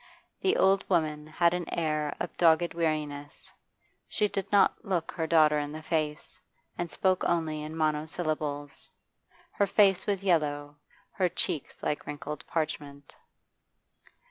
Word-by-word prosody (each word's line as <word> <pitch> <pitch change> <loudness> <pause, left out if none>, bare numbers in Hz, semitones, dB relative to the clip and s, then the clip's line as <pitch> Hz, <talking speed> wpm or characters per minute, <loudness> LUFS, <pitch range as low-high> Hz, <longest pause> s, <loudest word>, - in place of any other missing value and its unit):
The 385 0 +2
old 195 0 +4
woman 155 -4 0
had 170 +2 +2
an 180 -1 -3
air 155 -3 -1
of - - -4
dogged 170 0 +4
weariness; 150 -3 -3 0.6
she 210 - +1
did 195 -2 -4
not 200 -2 +4
look 180 -4 -1
her 160 -2 -2
daughter 155 -2 +5
in 145 0 -3
the 155 0 -7
face, 155 -2 -2 0.4
and 175 -1 -3
spoke 185 +1 +1
only 160 -3 0
in 155 +1 -6
monosyllables. 155 -2 -2 0.6
Her 200 - +1
face 195 -2 +4
was 200 -2 0
yellow, 145 -5 0 0.3
her 185 -3 +1
cheeks 160 -4 -3
like 150 - -2
wrinkled 150 +1 -6
parchment. 145 -3 -4
155 Hz, 135 wpm, -29 LUFS, 150-175 Hz, 0.6 s, daughter